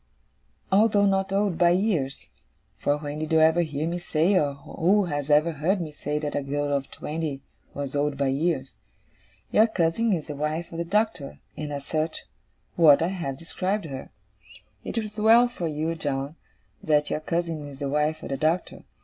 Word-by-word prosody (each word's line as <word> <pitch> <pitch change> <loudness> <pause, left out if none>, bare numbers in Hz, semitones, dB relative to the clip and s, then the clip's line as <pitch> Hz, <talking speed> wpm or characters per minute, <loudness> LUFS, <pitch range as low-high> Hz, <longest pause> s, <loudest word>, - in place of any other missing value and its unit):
Although 205 0 +4
not 195 -1 +1
old 195 -3 0
by 175 -1 +6
years 175 -7 0 0.5
for 145 0 +1
when 145 0 -5
did 155 0 -4
you 160 - +5
ever 160 +2 +5
hear 155 -1 -2
me 175 +1 -2
say, 170 +2 +1
or 145 -7 +2
who 185 +8 +1
has 145 -3 -3
ever 150 +3 +4
heard 165 +6 0
me 160 -3 -4
say, 150 0 -3
that 150 -1 -3
a 145 - 0
girl 145 +1 -1
of 135 -1 -3
twenty 150 -3 -4 0.3
was 140 -1 -4
old 145 0 0
by 140 -1 +1
years! 135 -1 -1 0.8
your 220 +2 +5
cousin 215 +3 +1
is 165 -6 0
the 150 - -6
wife 155 +3 -3
of 165 - -6
the 170 - -1
Doctor, 180 -6 -1 0.2
and, 150 -1 -5
as 140 -1 -5
such, 155 0 -2 0.5
what 160 -2 +6
I 170 - +1
have 170 -8 -4
described 185 +4 -2
her. 135 -4 -7 0.7
It - - -5
is 215 -1 -3
well 230 +3 +6
for 210 -9 -4
you, 155 +2 -2
John, 145 -2 -3 0.5
that 150 -1 +2
your - - 0
cousin 165 -2 -2
is 140 -1 -10
the 140 0 -3
wife 150 +2 0
of - - -6
the 135 - -2
Doctor. 160 +5 -1
155 Hz, 190 wpm, -26 LUFS, 145-180 Hz, 0.8 s, by